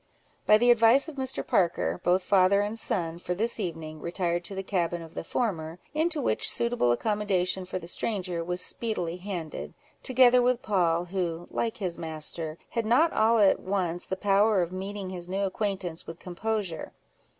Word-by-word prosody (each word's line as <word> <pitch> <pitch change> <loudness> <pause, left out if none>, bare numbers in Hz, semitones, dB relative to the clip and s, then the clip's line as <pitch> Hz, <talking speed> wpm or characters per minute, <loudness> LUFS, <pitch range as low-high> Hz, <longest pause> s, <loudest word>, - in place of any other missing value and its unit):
By 215 - +7
the 240 +2 +5
advice 240 +5 +5
of 315 - -8
Mr. 265 -1 -1
Parker, 175 -1 +1
both 180 +1 +2
father 195 +1 +4
and 210 +2 +1
son, 170 -5 0
for 180 0 -3
this 225 +4 0
evening, 160 -5 -5
retired 175 0 -2
to 195 - -6
the 195 - -4
cabin 175 -3 -1
of 165 - -13
the - - -5
former, 165 -6 -2 0.2
into 315 +1 +1
which 275 - +2
suitable 235 - +1
accommodation 190 - 0
for 185 - -4
the 175 - -8
stranger 180 -2 -2
was 180 +1 0
speedily 180 -7 -3
handed, 180 -5 -6 0.3
together 250 -1 +5
with 250 0 +1
Poll, 175 -4 +1
who, 175 -2 -3
like 230 -1 -2
his 185 -5 -4
master, 160 0 -4
had 230 -2 -2
not 310 +9 +4
all 225 +2 +3
at 200 -3 +4
once 180 -3 0
the 190 - -2
power 200 0 +3
of 170 - -5
meeting 190 +1 -5
his 175 -1 -7
new 195 +2 -1
acquaintance 195 -4 -3
with 165 - -8
composure. 190 0 -4
190 Hz, 175 wpm, -27 LUFS, 175-220 Hz, 0.3 s, By